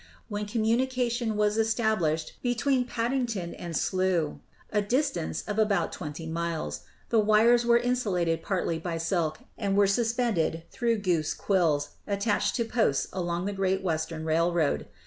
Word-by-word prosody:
When 205 Hz, 0 st, -3 dB
communication 235 Hz, 0 st, 0 dB
was 210 Hz, +1 st, +2 dB
established 215 Hz, -9 st, 0 dB
be 245 Hz, -1 st, 0 dB
tween 260 Hz, 0 st, +1 dB
Paddington 235 Hz, -7 st, -2 dB
and 170 Hz, -3 st, -4 dB
Slough, 185 Hz, -5 st, 0 dB, 0.3 s
a 210 Hz, -, +2 dB
distance 230 Hz, -, -1 dB
of 210 Hz, +1 st, -3 dB
about 205 Hz, -5 st, +2 dB
twenty 155 Hz, 0 st, -6 dB
miles, 160 Hz, -, -3 dB, 0.3 s
the 230 Hz, -, +4 dB
wires 225 Hz, +3 st, +4 dB
were 235 Hz, 0 st, +6 dB
insulated 200 Hz, -10 st, 0 dB
partly 170 Hz, -3 st, -1 dB
by 165 Hz, 0 st, -3 dB
silk 165 Hz, -1 st, -1 dB, 0.2 s
and 200 Hz, -2 st, 0 dB
were 205 Hz, -, +6 dB
suspended 220 Hz, -6 st, +1 dB
through 235 Hz, -1 st, +1 dB
goose 170 Hz, -6 st, 0 dB
quills 160 Hz, -7 st, +1 dB, 0.2 s
attached 205 Hz, +1 st, 0 dB
to 235 Hz, -, 0 dB
posts 220 Hz, -, +1 dB
along 175 Hz, -1 st, -2 dB
the 205 Hz, -, -2 dB
Great 190 Hz, 0 st, 0 dB
Western 160 Hz, -2 st, -2 dB
Railway. 165 Hz, -1 st, +1 dB
200 Hz, 145 wpm, -28 LUFS, 165-230 Hz, 0.3 s, were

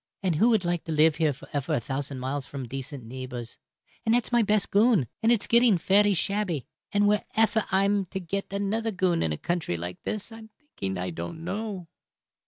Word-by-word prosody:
And 175 Hz, -5 st, +1 dB
who 225 Hz, +8 st, +5 dB
would 215 Hz, -6 st, +2 dB
like 175 Hz, -1 st, 0 dB
to 165 Hz, -, -4 dB
live 155 Hz, 0 st, +4 dB
here 155 Hz, -2 st, +2 dB
for 135 Hz, -, -11 dB
efer 145 Hz, +2 st, -1 dB
a -, -, +1 dB
thousand 135 Hz, +3 st, -4 dB
miles 130 Hz, +1 st, -3 dB
from 135 Hz, -2 st, -6 dB
decent 135 Hz, 0 st, -6 dB
neebors? 125 Hz, -1 st, -7 dB, 0.5 s
And 225 Hz, +1 st, +3 dB
that's 245 Hz, -, 0 dB
my 240 Hz, -1 st, +4 dB
best 210 Hz, -2 st, +1 dB
goon, 210 Hz, -, +4 dB, 0.2 s
and 225 Hz, -, +4 dB
it's 230 Hz, -4 st, +2 dB
getting 235 Hz, -4 st, +5 dB
fery 200 Hz, +3 st, +4 dB
shabby; 190 Hz, -6 st, -1 dB, 0.3 s
and 205 Hz, 0 st, +3 dB
wherefer 220 Hz, +1 st, +2 dB
I'm 195 Hz, +1 st, +2 dB
to 190 Hz, +2 st, -5 dB
get 195 Hz, +3 st, -4 dB
another 205 Hz, +3 st, -1 dB
goon 185 Hz, -4 st, +1 dB
in 80 Hz, -, 0 dB
a 75 Hz, -, -2 dB
country 170 Hz, -, -2 dB
like 90 Hz, +1 st, -6 dB
this 215 Hz, +2 st, -4 dB
I'm 225 Hz, -1 st, -11 dB
thinking 95 Hz, -, -5 dB
I 90 Hz, 0 st, -3 dB
don't 85 Hz, -, -6 dB
know." 195 Hz, -1 st, -4 dB
180 Hz, 200 wpm, -27 LUFS, 135-210 Hz, 0.5 s, who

